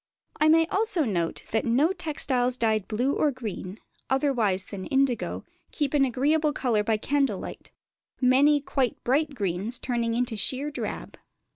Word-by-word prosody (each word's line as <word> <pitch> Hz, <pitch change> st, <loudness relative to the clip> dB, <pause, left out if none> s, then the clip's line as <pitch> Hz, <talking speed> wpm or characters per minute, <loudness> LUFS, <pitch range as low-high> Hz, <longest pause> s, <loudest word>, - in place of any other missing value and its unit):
I 305 Hz, -, +3 dB
may 325 Hz, +1 st, +5 dB
also 400 Hz, -1 st, +1 dB
note 170 Hz, -7 st, -2 dB
that 220 Hz, -, +1 dB
no 275 Hz, +10 st, +2 dB
textiles 255 Hz, -7 st, -1 dB
dyed 220 Hz, -4 st, +1 dB
blue 245 Hz, +6 st, 0 dB
or 305 Hz, -, +2 dB
green, 215 Hz, -7 st, -6 dB, 0.3 s
otherwise 240 Hz, -9 st, +1 dB
than 200 Hz, -2 st, -7 dB
by -, -, -6 dB
indigo, 265 Hz, -3 st, 0 dB, 0.3 s
keep 290 Hz, -3 st, -1 dB
an 280 Hz, -2 st, +4 dB
agreeable 295 Hz, +4 st, +1 dB
colour 235 Hz, -7 st, 0 dB
by 220 Hz, 0 st, +1 dB
candle 280 Hz, +5 st, 0 dB
light: -, -, -9 dB, 0.5 s
many 280 Hz, +3 st, +4 dB
quite 265 Hz, -3 st, -1 dB
bright 285 Hz, +3 st, +1 dB
greens 200 Hz, +3 st, 0 dB
turning 235 Hz, -2 st, -1 dB
into 245 Hz, -1 st, -1 dB
sheer 270 Hz, +7 st, -2 dB
drab. 295 Hz, -, -6 dB
255 Hz, 155 wpm, -26 LUFS, 225-290 Hz, 0.5 s, may